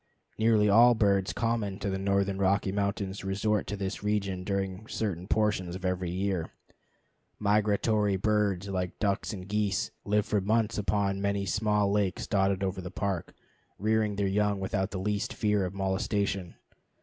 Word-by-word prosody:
Nearly 110 -1 +4
all 120 +4 +7
birds 100 -3 +2
common 115 -4 -1
to 100 - -3
the 95 - -2
northern 100 0 0
Rocky 100 0 +2
Mountains 100 -1 -2
resort 100 +2 0
to 105 - -3
this 95 -1 -4
region 100 -3 -1
during 100 +1 -3
certain 95 -5 -3
portions 100 -5 0
of 95 0 -6
every 90 -1 -1
year. 95 -1 -1 0.9
Migratory 105 0 +2
birds, 100 -1 +1
like 90 -2 -3
ducks 100 0 0
and 95 -3 -7
geese, 105 -2 0
live 105 0 +1
for 105 -1 +1
months 110 +2 +1
upon 100 0 0
many 100 0 0
small 105 -1 +1
lakes 100 -2 0
dotted 100 -1 +1
over 95 0 -2
the 90 - -6
Park, 95 -3 -3 0.4
rearing 110 0 +1
their 100 0 0
young 100 +1 +1
without 95 0 -1
the 100 - -5
least 105 +6 -1
fear 105 -3 +1
of 90 +1 -5
molestation. 95 -1 -1
100 Hz, 160 wpm, -29 LUFS, 95-105 Hz, 0.9 s, all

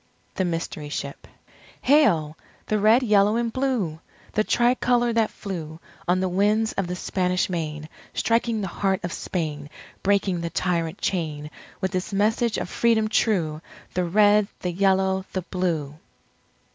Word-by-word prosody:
THE 190 - 0
MYSTERY 165 -3 -3
SHIP 140 -1 -5 0.6
Hail! 185 - +4 0.3
the 215 - 0
Red, 220 +5 +5
Yellow, 210 -2 +4
and 235 -1 -1
Blue! 245 - -1 0.3
The 215 - +2
Tri 240 +2 +3
Colour 240 -2 +1
that 225 -2 +2
flew 160 -5 -6 0.3
On 180 +1 +3
the 190 - +1
winds 210 +4 +2
of 195 - -2
the 180 - -3
Spanish 180 0 0
Main, 155 -3 -3 0.3
Striking 230 -1 +1
the 195 - -2
heart 190 +1 -1
of 175 - -3
Spain, 150 -5 -4 0.3
Breaking 195 -3 +1
the 170 - -2
Tyrant 170 0 -1
chain, 155 -5 -2 0.3
With 190 0 -1
its 185 +2 -2
message 220 +3 +1
of - - -3
Freedom 225 -2 +2
true! 165 -9 +1 0.3
The 180 -1 0
Red, 205 +3 +4
the 180 - -1
Yellow, 190 +1 +2
the 185 - -2
Blue! 160 -5 -2
190 Hz, 150 wpm, -24 LUFS, 170-215 Hz, 0.6 s, Red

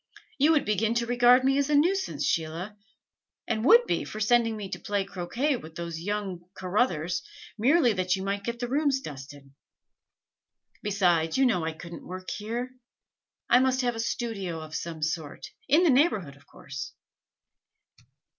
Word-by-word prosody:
You 305 +4 +5
would 300 - +2
begin 215 +2 +1
to 235 0 +1
regard 245 +1 +5
me 270 +1 +3
as 280 +1 0
a 300 - +3
nuisance, 375 +6 +1
Sheila, 165 +6 -2 0.7
and 220 -2 -1
would 470 - +7
be - - -1
for 215 - -7
sending 230 0 +2
me 205 -2 -5
to - - -5
play 205 -1 -1
croquet 230 +10 -1
with 160 -6 -12
those 170 -1 -5
young 195 -1 -3
Carruthers, 180 -3 0 0.3
merely 250 +2 +3
that 185 -1 0
you 190 - -5
might 200 +1 -2
get 235 +3 -3
the 245 0 -3
rooms 280 +1 +1
dusted. 140 - -10 1.3
Besides, 180 -5 +1
you 270 - +4
know 180 -10 +1
I 160 - -2
couldn't 170 +1 -10
work 185 +1 -7
here: 235 +4 -4 0.8
I 245 - +6
must 260 0 +2
have 245 -1 0
a 225 - -7
studio 215 -7 -3
of 155 -1 -10
some 160 0 -5
sort 160 -2 -3 0.2
in 310 +6 +5
the 335 - +5
neighborhood, 250 - +2
of 140 - -22
course. 135 -1 -8
210 Hz, 165 wpm, -27 LUFS, 170-250 Hz, 1.3 s, would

